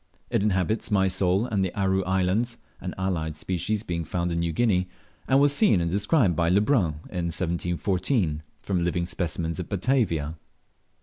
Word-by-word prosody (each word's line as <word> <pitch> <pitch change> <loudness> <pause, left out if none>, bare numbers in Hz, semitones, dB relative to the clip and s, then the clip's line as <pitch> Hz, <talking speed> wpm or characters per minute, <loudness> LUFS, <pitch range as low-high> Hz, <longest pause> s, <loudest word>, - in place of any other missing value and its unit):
It - - +2
inhabits 100 +1 0
Mysol 95 0 +2
and 100 -5 0
the 95 - -1
Aru 95 -1 +2
Islands 95 +6 0 0.2
(an - - -5
allied 85 -5 -2
species 95 +5 -2
being 85 -4 -3
found 85 +2 -2
in 85 - -1
New 85 0 0
Guinea), 90 -1 +1 0.4
and 135 - +4
was 145 0 +4
seen 170 - +4
and 85 -1 -1
described 100 - +2
by 85 +1 +2
Le 95 +3 +4
Brun 100 - +1
in 90 -2 -2
1714, 90 - -1 0.2
from 90 -3 0
living 85 0 0
specimens 85 -1 -3
at 90 - -5
Batavia. 95 - 0
90 Hz, 165 wpm, -26 LUFS, 85-105 Hz, 0.4 s, and